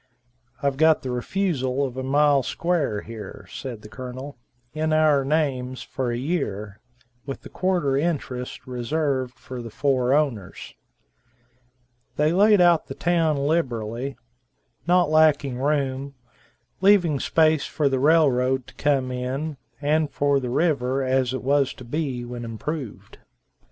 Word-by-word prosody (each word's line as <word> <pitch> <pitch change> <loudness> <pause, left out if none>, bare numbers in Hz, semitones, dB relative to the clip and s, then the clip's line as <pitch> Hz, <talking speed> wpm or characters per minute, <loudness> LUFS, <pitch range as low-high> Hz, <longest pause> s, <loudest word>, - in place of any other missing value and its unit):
"I've 140 -1 +1
got 160 +1 +4
the 130 - -3
refusal 135 -1 -1
of 130 -2 -6
a 130 - -3
mile 140 +1 +3
square 150 -8 -1
here," 110 -3 -9
said 120 -5 -7
the - - -9
Colonel, 130 +4 -8 0.4
"in 155 0 0
our 155 -3 +4
names, 135 -4 -1
for 130 -2 -3
a 120 - -1
year, 105 - -3 0.5
with 135 - -6
a - - -8
quarter 175 -7 0
interest 135 -6 -3
reserved 130 0 -2
for 130 -1 -8
the 115 - -7
four 130 +1 +1
owners." 120 -11 -2 1.4
They 150 +2 +2
laid 205 +2 +5
out 175 -2 +4
the - - -7
town 165 -3 +1
liberally, 130 -4 -1 0.7
not 175 -3 +3
lacking 150 -5 +3
room, 140 -1 -1 0.7
leaving 185 -7 +4
space 155 0 +2
for 150 - 0
the 135 -1 +1
railroad 130 -4 +3
to - - -15
come 135 -3 0
in, 135 +4 -3 0.2
and 150 +1 +1
for 140 -1 +1
the 125 -2 -4
river 135 -2 +1
as 130 -1 +1
it 130 - -4
was 140 0 +2
to - - -11
be 130 -1 -3
when 120 0 -6
improved. 120 +2 -6
140 Hz, 140 wpm, -24 LUFS, 125-155 Hz, 1.4 s, laid